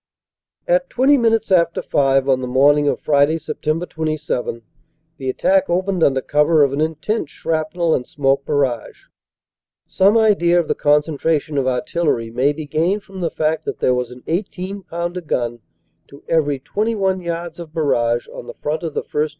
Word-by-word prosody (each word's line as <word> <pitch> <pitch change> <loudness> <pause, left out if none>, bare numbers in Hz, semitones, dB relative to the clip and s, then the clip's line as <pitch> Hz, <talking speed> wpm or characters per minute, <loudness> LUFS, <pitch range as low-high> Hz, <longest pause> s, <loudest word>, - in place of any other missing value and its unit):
"At - - +2
twenty 270 +3 +4
minutes 225 -4 +1
after 170 -2 +2
five 135 -1 +2
on 130 -1 +2
the 125 - -3
morning 145 +3 +4
of - - 0
Friday, 145 +2 +2
Sept. 160 +1 -3
27, 155 -7 -3 0.5
the 135 -2 -4
attack 190 +8 +2
opened 185 0 0
under 135 -1 +3
cover 150 +3 +3
of 140 -1 +1
an 145 - -1
intense 160 +4 -2
shrapnel 160 +1 -1
and 125 - -1
smoke 140 -1 0
barrage. 135 -6 -2 0.8
Some 200 +4 +3
idea 185 -6 +3
of 170 - -1
the - - +1
concentration 150 0 +1
of 135 -2 +1
artil 130 +7 -1
lery 115 -6 0
may 130 +5 +2
be 155 +1 -6
gained 170 +8 0
from 190 -1 -10
the 170 - 0
fact 155 0 -1
that - - -4
there 125 - +2
was 125 -1 -2
an 125 0 -13
18 190 +2 -3
pounder 175 0 -4
gun 120 -6 -2 0.5
to 140 - -15
every 145 -4 +1
21 195 - -1
yards 170 -1 -5
of 165 -3 -8
barrage 120 -7 0
on 120 - -10
the - - -8
front 155 +2 -3
of 165 -4 -5
the - - -1
1st. 150 +1 -1
155 Hz, 175 wpm, -19 LUFS, 140-175 Hz, 0.8 s, twenty